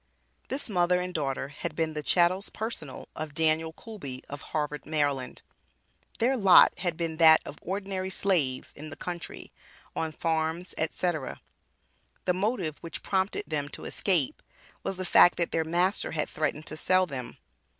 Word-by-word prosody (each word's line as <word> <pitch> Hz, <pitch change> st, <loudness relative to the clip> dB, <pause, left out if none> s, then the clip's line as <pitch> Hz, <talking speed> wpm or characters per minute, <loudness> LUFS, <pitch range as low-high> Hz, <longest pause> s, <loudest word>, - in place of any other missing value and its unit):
This 275 Hz, +2 st, -3 dB
mother 180 Hz, -3 st, +2 dB
and 180 Hz, 0 st, -3 dB
daughter 135 Hz, -3 st, -2 dB
had 145 Hz, +1 st, -5 dB
been 160 Hz, -1 st, 0 dB
the 150 Hz, -, -3 dB
"chattels 180 Hz, +5 st, +3 dB
personal" 210 Hz, -, -5 dB
of 155 Hz, -2 st, -5 dB
Daniel 160 Hz, 0 st, +2 dB
Coolby 160 Hz, -, -8 dB
of 145 Hz, 0 st, -6 dB
Harvard, 150 Hz, -1 st, -3 dB
Md. 145 Hz, -4 st, -1 dB, 0.8 s
Their 250 Hz, +4 st, +2 dB
lot 195 Hz, -7 st, +7 dB
had 175 Hz, -3 st, -1 dB
been 165 Hz, -2 st, -2 dB
that 160 Hz, -1 st, +8 dB
of 145 Hz, -, -8 dB
ordinary 190 Hz, 0 st, -3 dB
slaves 170 Hz, -10 st, 0 dB
in 155 Hz, +2 st, -8 dB
the -, -, -8 dB
country, 175 Hz, -1 st, -6 dB, 0.4 s
on 160 Hz, -1 st, -1 dB
farms, 160 Hz, +2 st, -1 dB
&c. 160 Hz, +3 st, -1 dB, 1.2 s
The 180 Hz, -, +3 dB
motive 185 Hz, -, -1 dB
which 165 Hz, -, -7 dB
prompted 190 Hz, 0 st, 0 dB
them 145 Hz, -2 st, -2 dB
to -, -, -8 dB
escape 175 Hz, -9 st, 0 dB, 0.4 s
was 195 Hz, -, -3 dB
the 185 Hz, -, -3 dB
fact 175 Hz, 0 st, +7 dB
that 170 Hz, -, 0 dB
their 165 Hz, -, +1 dB
master 175 Hz, +5 st, +1 dB
had 150 Hz, -2 st, 0 dB
"threatened 155 Hz, 0 st, -2 dB
to 155 Hz, -, -5 dB
sell" 185 Hz, +3 st, +3 dB
them. 135 Hz, -6 st, -6 dB
165 Hz, 160 wpm, -28 LUFS, 155-185 Hz, 1.2 s, that